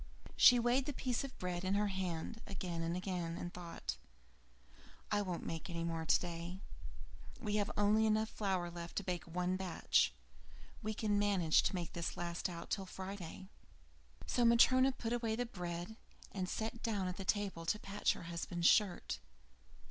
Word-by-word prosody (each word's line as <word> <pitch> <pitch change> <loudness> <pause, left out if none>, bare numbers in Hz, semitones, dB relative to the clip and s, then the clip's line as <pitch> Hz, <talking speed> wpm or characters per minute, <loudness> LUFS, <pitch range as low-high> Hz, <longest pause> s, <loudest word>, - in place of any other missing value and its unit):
She 245 - +9
weighed 245 +3 +2
the 290 - -1
piece 250 -1 -1
of 275 -1 -7
bread 180 -1 -3
in 190 +1 +1
her 205 0 +2
hand 190 +2 -3
again 180 -4 -3
and 165 +2 -1
again, 180 -3 -2
and 175 - -5
thought: 170 - -5 1.1
"I 205 -1 +3
won't 180 -4 -3
make 165 +2 -4
any 170 -1 -3
more 165 -1 -2
today. 175 +2 0 0.8
We 210 -4 0
have 205 -1 +1
only 210 +2 +4
enough 215 0 +2
flour 185 -4 -1
left 170 0 -7
to 200 - -1
bake 180 -2 -3
one 180 +2 -1
batch; 185 -3 +2 0.7
We 215 +1 -2
can 205 -2 +1
manage 190 -6 +4
to - - 0
make 175 -3 -3
this 170 -1 -3
last 175 +1 -2
out 170 -1 -7
till 195 -2 -1
Friday." 190 -1 -7 0.8
So 245 - +1
Matryona 255 +3 +6
put 235 -2 -3
away 230 -2 0
the 245 +2 -1
bread, 180 0 -5 0.3
and 185 -2 -3
sat 225 +1 -3
down 205 -5 0
at 180 - -4
the 195 - -4
table 190 -5 -1
to 210 - +2
patch 205 0 0
her - - -9
husband's 170 0 -3
shirt. 205 -4 +3
190 Hz, 170 wpm, -36 LUFS, 175-215 Hz, 1.1 s, She